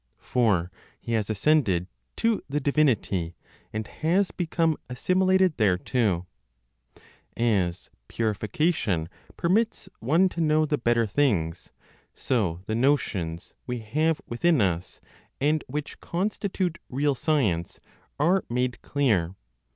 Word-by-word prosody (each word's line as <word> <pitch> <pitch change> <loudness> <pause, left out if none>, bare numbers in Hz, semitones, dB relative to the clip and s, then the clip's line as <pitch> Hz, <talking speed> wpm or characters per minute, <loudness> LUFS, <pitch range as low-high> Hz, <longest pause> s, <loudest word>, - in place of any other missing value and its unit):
For 100 -8 +1 0.3
he 115 - -7
has 110 -2 0
ascended 105 - +2 0.3
to 230 -2 +1
the 145 +2 0
divinity, 120 - +1 0.4
and 110 0 -3
has 180 - 0
become 165 -2 0
assimilated 185 +6 +2
thereto. 95 -1 +1 1.1
As 100 -7 0 0.2
purification 110 - 0 0.3
permits 190 +2 +1
one 160 +11 +3
to 170 - -4
know 155 0 +3
the 150 -1 -1
better 120 -1 +2
things, 100 - 0 0.4
so 95 -9 -1
the 110 - -3
notions 105 - 0
we 125 -2 -3
have 155 +8 0
within 155 +6 +2
us, 90 -3 -1 0.4
and 150 +2 +1
which 145 +3 -5
constitute 190 -1 -2
real 140 +3 +1
science, 125 - 0 0.4
are 180 +6 +3
made 125 +1 -1
clear. 105 -11 +1
125 Hz, 110 wpm, -26 LUFS, 100-155 Hz, 1.1 s, one